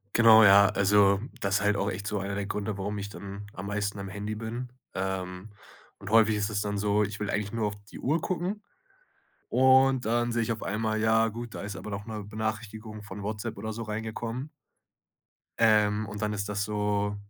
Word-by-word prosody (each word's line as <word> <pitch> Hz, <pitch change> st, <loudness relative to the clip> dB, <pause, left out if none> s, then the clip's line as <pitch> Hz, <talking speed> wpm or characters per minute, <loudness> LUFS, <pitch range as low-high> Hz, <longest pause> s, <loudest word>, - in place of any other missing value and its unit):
Genau, 110 Hz, -1 st, +8 dB
ja. 100 Hz, 0 st, +8 dB
Also 100 Hz, 0 st, +4 dB, 0.2 s
das 100 Hz, +1 st, +1 dB
ist -, -, +1 dB
halt 105 Hz, 0 st, +2 dB
auch 100 Hz, +1 st, 0 dB
echt 100 Hz, +2 st, -5 dB
so 105 Hz, -, -1 dB
einer 100 Hz, +1 st, -3 dB
der 100 Hz, 0 st, -2 dB
Gründe, 105 Hz, 0 st, -3 dB
warum 105 Hz, +2 st, -3 dB
ich 100 Hz, -, -4 dB
dann 100 Hz, 0 st, -8 dB
am 95 Hz, +2 st, -7 dB
meisten 105 Hz, 0 st, -2 dB
am 100 Hz, -, -5 dB
Handy 105 Hz, +2 st, -4 dB
bin. 115 Hz, +3 st, -5 dB, 0.3 s
Ähm, 95 Hz, +1 st, -4 dB, 0.5 s
und 100 Hz, -, -8 dB
häufig 110 Hz, -1 st, +5 dB
ist 105 Hz, +1 st, -1 dB
es 105 Hz, -1 st, -1 dB
dann 105 Hz, -1 st, -2 dB
so: 105 Hz, +1 st, +2 dB
Ich 105 Hz, 0 st, -3 dB
will 105 Hz, -, -1 dB
eigentlich 105 Hz, 0 st, -2 dB
nur 115 Hz, -2 st, 0 dB
auf 100 Hz, -, -6 dB
die -, -, -9 dB
Uhr 155 Hz, +5 st, +1 dB
gucken 185 Hz, +4 st, -2 dB, 0.9 s
und 130 Hz, 0 st, +5 dB
dann 120 Hz, +1 st, +1 dB
sehe 115 Hz, 0 st, +1 dB
ich 115 Hz, -, -2 dB
auf 110 Hz, -, -3 dB
einmal: 110 Hz, +1 st, -1 dB
Ja 110 Hz, 0 st, +4 dB
gut, 120 Hz, +1 st, -7 dB
da -, -, -5 dB
ist 100 Hz, 0 st, -5 dB
aber 105 Hz, -, -7 dB
doch 100 Hz, 0 st, -5 dB
'ne 110 Hz, -2 st, -5 dB
Benachrichtigung 110 Hz, 0 st, -5 dB
von 100 Hz, 0 st, -8 dB
WhatsApp 110 Hz, +2 st, -4 dB
oder 110 Hz, 0 st, -4 dB
so 115 Hz, -, -5 dB
reingekommen. 115 Hz, +5 st, -4 dB, 1.1 s
Ähm, 105 Hz, -1 st, +4 dB
und 105 Hz, +1 st, -6 dB
dann 105 Hz, 0 st, 0 dB
ist 100 Hz, 0 st, -3 dB
das 100 Hz, 0 st, -1 dB
so, 105 Hz, -1 st, -1 dB
105 Hz, 210 wpm, -28 LUFS, 100-110 Hz, 1.1 s, Genau